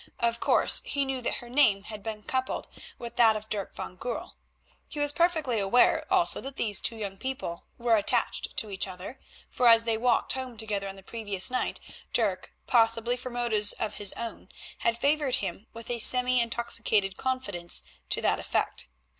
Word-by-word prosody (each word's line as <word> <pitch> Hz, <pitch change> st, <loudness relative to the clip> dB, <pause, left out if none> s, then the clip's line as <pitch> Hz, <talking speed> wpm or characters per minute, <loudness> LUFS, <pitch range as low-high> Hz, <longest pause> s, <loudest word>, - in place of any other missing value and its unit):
Of 235 Hz, 0 st, 0 dB
course, -, -, +3 dB
he 280 Hz, -1 st, -1 dB
knew 265 Hz, -1 st, -3 dB
that -, -, -2 dB
her 240 Hz, -, -8 dB
name 240 Hz, -7 st, +3 dB
had 210 Hz, 0 st, -8 dB
been 215 Hz, 0 st, -6 dB
coupled 260 Hz, +2 st, -2 dB, 0.3 s
with 235 Hz, -1 st, -9 dB
that 225 Hz, -2 st, +6 dB
of 215 Hz, 0 st, -6 dB
Dirk 200 Hz, -2 st, -3 dB
van 180 Hz, -, -7 dB
Goorl. 245 Hz, +3 st, -5 dB, 0.6 s
He 295 Hz, -, -7 dB
was 290 Hz, 0 st, +3 dB
perfectly 315 Hz, -8 st, +1 dB
aware 225 Hz, -, +3 dB
also 370 Hz, -2 st, +4 dB
that 270 Hz, 0 st, -7 dB
these 210 Hz, -6 st, +3 dB
two 230 Hz, -, 0 dB
young 200 Hz, -3 st, -5 dB
people 260 Hz, -10 st, -5 dB
were 235 Hz, -1 st, +3 dB
attached 225 Hz, +3 st, 0 dB
to 215 Hz, -, +1 dB
each 195 Hz, 0 st, -1 dB
other, 185 Hz, +7 st, -9 dB, 0.3 s
for 250 Hz, -, +2 dB
as 230 Hz, -1 st, +8 dB
they 225 Hz, -1 st, -1 dB
walked 245 Hz, +1 st, +2 dB
home 260 Hz, -3 st, -6 dB
together 210 Hz, -3 st, -1 dB
on 195 Hz, -, -7 dB
the 195 Hz, -, -14 dB
previous 205 Hz, -2 st, -1 dB
night 255 Hz, -, -2 dB, 0.3 s
Dirk, 205 Hz, -6 st, 0 dB
possibly 230 Hz, 0 st, +2 dB
for 250 Hz, +1 st, -7 dB
motives 235 Hz, -4 st, +3 dB
of 220 Hz, -, -4 dB
his 200 Hz, -, +4 dB
own, 230 Hz, -1 st, -7 dB, 0.3 s
had 230 Hz, 0 st, +1 dB
favoured 285 Hz, -1 st, +1 dB
him 195 Hz, +2 st, -5 dB
with 230 Hz, +1 st, -8 dB
a 240 Hz, -, -2 dB
semi 250 Hz, +2 st, +4 dB
intoxicated 230 Hz, -4 st, 0 dB
confidence 210 Hz, -11 st, -2 dB, 0.3 s
to -, -, 0 dB
that -, -, +2 dB
effect. -, -, -2 dB
230 Hz, 185 wpm, -28 LUFS, 210-250 Hz, 0.6 s, as